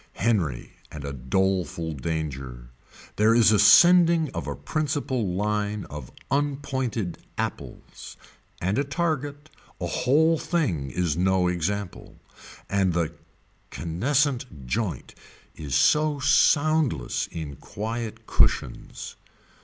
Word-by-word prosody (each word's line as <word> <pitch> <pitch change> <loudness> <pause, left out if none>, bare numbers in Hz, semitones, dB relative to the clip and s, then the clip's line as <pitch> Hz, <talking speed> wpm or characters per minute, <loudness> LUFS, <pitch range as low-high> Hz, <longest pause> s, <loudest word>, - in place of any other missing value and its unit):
Henry 90 - -1 0.2
and 75 -2 -7
a 70 - -4
doleful 85 +4 -1
danger. 70 -5 -5 0.5
There 110 +2 +4
is 115 -2 +6
a 105 - +4
sending 170 - +6
of - - -5
a - - -3
principle 140 - -2
line 105 0 -1
of 75 -4 -8 0.2
unpointed 135 -8 -2 0.2
apples, - - -6 0.4
and 95 +7 0
a - - +2
target, 145 -1 -3 0.3
a - - -3
whole 160 +5 +2
thing 95 - -1
is 85 +2 -1
no 90 +1 +2
example. 90 +2 -3 0.5
And 95 -3 +1
the 85 -1 -1 0.6
caneseat 125 - -1
joint 85 - -3 0.4
is 70 -3 -4
so 150 - +3
soundless 145 - +2
in 75 -5 -7
quiet 110 +1 -5
cushions. - - 0
105 Hz, 105 wpm, -25 LUFS, -, 0.6 s, is